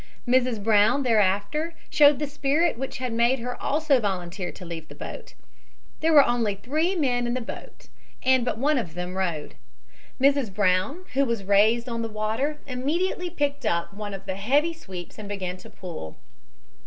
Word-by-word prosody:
Mrs. 245 -4 +2
Brown 215 +5 +4
thereafter 230 - +1 0.2
showed 290 -1 +6
the 295 - -1
spirit 295 +3 +1
which 265 +3 -5
had 250 -2 -3
made 235 +3 +3
her 245 0 -4
also 295 -2 +2
volunteer 185 -3 -3
to 180 - -11
leave 165 -2 -7
the - - -12
boat. - - -8 0.6
There 325 +1 +2
were 290 -3 +8
only 230 -4 +1
three 310 - 0
men 245 -7 +1
in 240 - -1
the - - -1
boat 230 - -9 0.4
and 260 -1 +4
but 240 - -1
one 285 +3 +2
of 170 -8 -6
them 180 +1 -4
rowed. 170 -6 -2 0.7
Mrs. 275 -4 +3
Brown, 200 - +1
who 275 +1 +3
was 235 -6 -1
raised 215 +5 +3
on 230 -1 -3
the 225 - -3
water, 220 +8 -1
immediately 335 +8 -1
picked 290 -4 -2
up 170 -3 -1
one 205 -1 -5
of 195 - -10
the 190 - -3
heavy 285 +11 +2
sweeps 190 - -9
and 205 -1 -7
began 185 -3 -4
to - - -13
pull. 160 - -8
235 Hz, 180 wpm, -25 LUFS, 200-280 Hz, 0.7 s, were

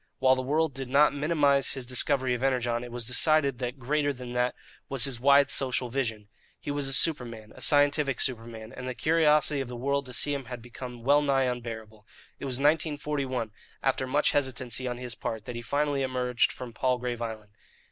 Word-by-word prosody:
While 130 0 +4
the 130 - -1
world 150 +3 0
did 135 -1 -5
not 140 +2 +5
minimize 145 -2 +2
his 130 -2 -5
discovery 130 +1 +1
of 125 - -3
Energon, 125 -3 0
it 120 - -8
was 120 -1 -4
decided 140 +1 +3
that 125 +1 -4
greater 145 +3 0
than 125 -2 -8
that 125 0 0 0.3
was 135 -3 +1
his 135 -4 0
wide 140 +2 +5
social 130 -2 0
vision. 115 -5 -3 0.3
He - - -5
was 145 -1 -1
a 135 - -1
superman, 120 -8 +1
a - - -12
scientific 145 -2 +3
superman; 115 -3 -3
and 125 - -6
the 130 - -4
curiosity 150 -1 +3
of 135 - -5
the 125 - -7
world 140 +2 -1
to 125 - -8
see 145 +3 +1
him 140 -2 -4
had 125 0 -7
become 120 0 -9
wellnigh 140 0 +3
unbearable. 115 -4 -5 0.3
It - - -6
was 130 -2 -1
in 140 - -3
1941, 145 -6 0 0.3
after 130 -1 0
much 145 +3 +2
hesitancy 130 -2 -1
on 125 -1 -3
his 125 -1 -6
part, 110 -3 -5
that 125 - -6
he 120 - -4
finally 140 +3 0
emerged 125 -2 +1
from 125 -2 -8
Palgrave 125 -1 -1
Island. 110 -3 -6
130 Hz, 200 wpm, -28 LUFS, 120-140 Hz, 0.3 s, not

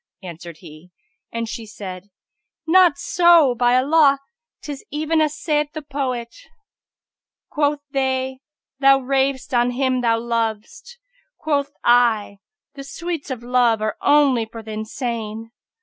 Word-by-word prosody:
answered 170 -2 -9
he, 160 0 -14 0.4
and 230 0 -3
she 230 +1 -6
said, 195 -3 -9 0.6
"Not 350 -1 +5
so, 340 -6 +4
by 245 +1 +2
Allah! 280 +1 +4 0.5
'tis 285 -2 -7
even 310 +2 0
as 305 -1 0
saith 300 -1 -1
the 310 -1 -6
poet, 260 -5 -4 1.2
'Quoth 295 0 0
they 265 -1 -1 0.4
'Thou 275 0 +5
rav'st 265 0 -1
on 240 0 +3
him 255 0 0
thou 230 -1 +2
lov'st': 230 - -4 0.4
quoth 285 -2 -1
I, 230 -4 +2 0.2
* - - -69
'The 275 -1 -9
sweets 330 +2 -6
of 250 -3 -5
love 240 -2 +2
are 215 0 -2
only 275 -6 +3
for 225 0 -10
th' 220 - -11
insane!' 225 0 -5
255 Hz, 135 wpm, -21 LUFS, 225-290 Hz, 1.2 s, Not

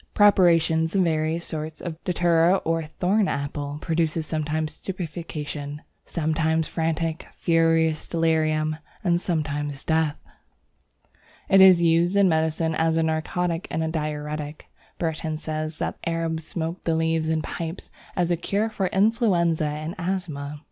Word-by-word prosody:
Preparations 165 -4 +4
of 190 - +4
various 160 0 0
sorts 155 -1 -5
of 165 -2 -7
Datura 175 0 +3
or 165 0 +1
Thorn 190 +6 +1
apple 145 +1 -3
produce 165 -1 0
sometimes 155 0 -2
stupefaction, 155 -5 -6 0.2
sometimes 160 0 0
frantic, 165 0 -2
furious 165 -1 +2
delirium, 155 -2 +1 0.3
and 175 -2 +2
sometimes 145 -5 -2
death. 160 -2 +1 1.3
It 195 0 +7
is 185 -2 +8
used 170 +3 +3
in 200 -1 +5
medicine 160 0 +1
as 160 +1 +1
a 165 - +3
narcotic 165 +2 -1
and 160 0 -2
diuretic. 150 -1 -4 0.3
Burton 160 -1 -2
says 155 0 -4
that - - -3
the - - -2
Arabs 165 -1 -2
smoke 165 +1 -3
the 165 - +1
leaves 160 0 +1
in 160 -1 0
pipes 165 +1 -5 0.2
as 175 -2 +1
a - - +4
cure 205 +6 -1
for 195 -3 -1
influenza 190 -6 +2
and 155 +2 -4
asthma. 155 -6 -3
160 Hz, 135 wpm, -24 LUFS, 155-170 Hz, 1.3 s, is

